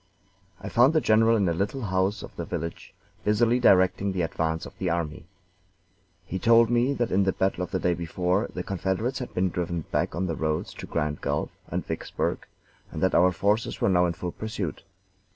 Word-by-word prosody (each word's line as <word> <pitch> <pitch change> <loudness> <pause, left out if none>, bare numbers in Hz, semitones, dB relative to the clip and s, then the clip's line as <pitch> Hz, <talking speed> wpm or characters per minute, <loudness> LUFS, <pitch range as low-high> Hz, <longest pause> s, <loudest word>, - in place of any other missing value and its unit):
I - - -7
found 125 +6 +4
the 160 - +4
general 115 -2 +4
in 100 -3 +2
a 85 - +2
little 100 +9 -2
house 95 +1 0
of - - -10
the - - -4
village, 85 +1 -6 0.3
busily 115 +3 +3
directing 95 -2 +4
the 90 -2 0
advance 80 0 -2
of - - -11
the 95 - 0
army. 80 -2 -3 1.0
He 95 - -4
told 115 +2 +5
me 120 +4 +2
that 120 -2 -1
in 100 +2 +3
the 95 - +2
battle 95 -1 0
of - - -5
the - - -1
day 90 - +1
before 90 +4 -1
the 90 - -4
Confederates 100 +8 -2
had 125 - -6
been 90 0 +1
driven 85 -1 -2
back - - 0
on 95 +2 -1
the 85 - -1
roads 80 -1 -2
to - - -9
Grand 75 0 -2
Gulf - - -1 0.2
and - - -3
Vicksburg, - - -3 0.4
and - - -6
that 95 - +3
our 90 +2 +5
forces 105 +5 0
were - - +2
now 90 -1 +4
in 85 - -1
full 90 +1 -5
pursuit. 105 -7 -5
95 Hz, 205 wpm, -26 LUFS, 85-110 Hz, 1.0 s, told